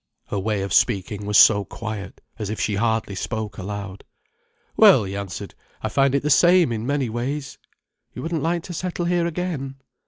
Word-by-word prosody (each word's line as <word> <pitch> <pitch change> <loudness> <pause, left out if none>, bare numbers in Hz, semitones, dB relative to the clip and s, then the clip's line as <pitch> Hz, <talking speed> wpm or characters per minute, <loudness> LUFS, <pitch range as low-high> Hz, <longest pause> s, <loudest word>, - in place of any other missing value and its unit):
Her 100 - -2
way 105 0 -1
of 100 - -3
speaking 105 -2 +1
was 105 0 +3
so 100 -2 +7
quiet, 105 -3 -7 0.2
as 105 -2 -3
if 110 - -4
she 105 - 0
hardly 110 0 0
spoke 105 +1 -4
aloud. 100 0 -6 0.7
"Well," - - +7
he 95 0 -5
answered. 100 -2 -6 0.3
"I - - -1
find 135 0 +2
it 140 - 0
the 150 - +1
same 175 -1 +5
in 115 +1 -3
many 140 -2 0
ways." 135 +5 -4 0.6
"You - - -6
wouldn't 165 -1 -2
like 170 +2 -1
to 180 - -7
settle 175 0 -3
here 175 -1 +1
again?" 160 -6 -4
115 Hz, 185 wpm, -23 LUFS, 100-150 Hz, 0.7 s, so